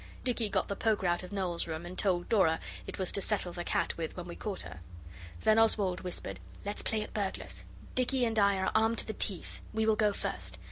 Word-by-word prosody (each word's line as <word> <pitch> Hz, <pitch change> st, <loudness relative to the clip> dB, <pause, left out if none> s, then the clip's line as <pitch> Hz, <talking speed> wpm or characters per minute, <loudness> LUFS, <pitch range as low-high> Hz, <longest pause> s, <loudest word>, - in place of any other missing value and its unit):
Dicky 240 Hz, -4 st, 0 dB
got 195 Hz, -2 st, +1 dB
the 200 Hz, -, -2 dB
poker 215 Hz, -2 st, +1 dB
out 175 Hz, 0 st, +2 dB
of 180 Hz, -, -9 dB
Noel's 185 Hz, -5 st, 0 dB
room, 160 Hz, +1 st, -4 dB
and 175 Hz, +1 st, -6 dB
told 180 Hz, -3 st, +1 dB
Dora 185 Hz, -8 st, +4 dB, 0.3 s
it -, -, -5 dB
was 190 Hz, -2 st, +2 dB
to 200 Hz, -, -1 dB
settle 190 Hz, -4 st, 0 dB
the 175 Hz, 0 st, -3 dB
cat -, -, 0 dB
with 165 Hz, +1 st, -4 dB
when 180 Hz, -, -4 dB
we 175 Hz, -, -7 dB
caught 205 Hz, -3 st, -4 dB
her. 90 Hz, +1 st, -8 dB, 0.6 s
Then 220 Hz, +1 st, +5 dB
Oswald 205 Hz, -5 st, +3 dB
whispered, 180 Hz, -1 st, -4 dB, 0.3 s
'Let's 205 Hz, +1 st, -2 dB
play 215 Hz, -1 st, 0 dB
at -, -, -10 dB
burglars; 200 Hz, -3 st, -3 dB, 0.3 s
Dicky 255 Hz, 0 st, +2 dB
and 225 Hz, -1 st, +1 dB
I 200 Hz, -1 st, +5 dB
are 190 Hz, -, +1 dB
armed 225 Hz, +1 st, +3 dB
to -, -, +3 dB
the 220 Hz, -, -3 dB
teeth, 195 Hz, -3 st, -2 dB
we 220 Hz, 0 st, +2 dB
will 220 Hz, -1 st, +4 dB
go 210 Hz, -1 st, +3 dB
first. 90 Hz, -, -4 dB
200 Hz, 230 wpm, -32 LUFS, 175-220 Hz, 0.6 s, Then